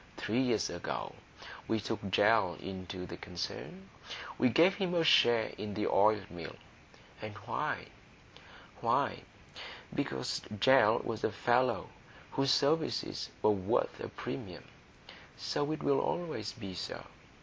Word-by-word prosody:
Three 115 Hz, +5 st, 0 dB
years 125 Hz, -2 st, +2 dB
ago -, -, -4 dB, 0.5 s
we 110 Hz, -, +1 dB
took 105 Hz, -2 st, -4 dB
Gell 100 Hz, -2 st, +4 dB
into 95 Hz, -1 st, -6 dB
the -, -, -8 dB
concern; 90 Hz, +2 st, -6 dB, 0.5 s
we 125 Hz, -, +5 dB
gave 165 Hz, +10 st, +5 dB
him 185 Hz, -3 st, -1 dB
a 170 Hz, -, +3 dB
share 120 Hz, -7 st, +5 dB
in 105 Hz, -2 st, -4 dB
the 105 Hz, -, 0 dB
oil 105 Hz, +1 st, +4 dB
mill. 85 Hz, -2 st, -7 dB, 0.7 s
And 110 Hz, -1 st, -6 dB
why? -, -, -2 dB, 0.9 s
Why, -, -, +1 dB, 0.7 s
because 65 Hz, -1 st, -2 dB, 0.2 s
Gell 115 Hz, -1 st, +6 dB
was 115 Hz, -1 st, -4 dB
a -, -, +2 dB
fellow 120 Hz, +1 st, +1 dB, 0.4 s
whose 135 Hz, 0 st, +1 dB
services 155 Hz, +4 st, +1 dB
were 105 Hz, -, +6 dB
worth 95 Hz, -3 st, 0 dB
a -, -, -5 dB
premium. -, -, -6 dB, 0.7 s
So 145 Hz, +1 st, -1 dB
it 155 Hz, -, -3 dB
will 140 Hz, -1 st, +3 dB
always 155 Hz, -, -2 dB
be, 100 Hz, -5 st, -7 dB
sir. 90 Hz, -, -5 dB
110 Hz, 130 wpm, -32 LUFS, 95-135 Hz, 0.9 s, Gell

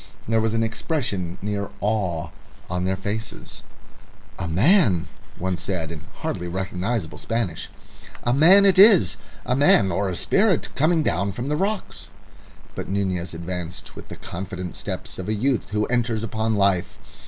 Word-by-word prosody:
There 115 Hz, 0 st, +2 dB
was 110 Hz, 0 st, 0 dB
an 115 Hz, -, +2 dB
expression 110 Hz, -, -2 dB
near 100 Hz, -1 st, -2 dB
awe 95 Hz, -6 st, -1 dB, 0.4 s
on 90 Hz, 0 st, -1 dB
their 95 Hz, +1 st, +1 dB
faces. 105 Hz, +4 st, -6 dB, 0.8 s
"A 90 Hz, -, -2 dB
man," 100 Hz, -, +3 dB, 0.3 s
one 95 Hz, 0 st, -2 dB
said, 85 Hz, -3 st, -3 dB
in 80 Hz, -3 st, -7 dB, 0.2 s
hardly 90 Hz, -, -3 dB
recognisable 95 Hz, +2 st, -3 dB
Spanish 115 Hz, -8 st, -2 dB, 0.5 s
"a 120 Hz, -, +2 dB
man 180 Hz, +9 st, +7 dB
it 190 Hz, -1 st, +5 dB
is 200 Hz, -3 st, +7 dB, 0.3 s
a 125 Hz, -, +1 dB
man 125 Hz, -8 st, +5 dB
or 95 Hz, +3 st, 0 dB
a 90 Hz, -, -3 dB
spirit 195 Hz, -, +2 dB
coming 160 Hz, +2 st, +2 dB
down 100 Hz, -, 0 dB
from 125 Hz, +6 st, -4 dB
the 150 Hz, -, +1 dB
rocks." 200 Hz, +5 st, -3 dB, 0.7 s
But -, -, -6 dB
Nunez 95 Hz, -3 st, -1 dB
advanced 90 Hz, +1 st, -6 dB
with -, -, -10 dB
the -, -, -8 dB
confident 90 Hz, 0 st, -6 dB
steps -, -, -6 dB
of 95 Hz, -, -4 dB
a 110 Hz, -, +1 dB
youth 125 Hz, +3 st, 0 dB
who 105 Hz, +1 st, 0 dB
enters 120 Hz, -2 st, 0 dB
upon 110 Hz, 0 st, -1 dB
life. 100 Hz, -3 st, +1 dB
100 Hz, 155 wpm, -23 LUFS, 90-120 Hz, 0.8 s, man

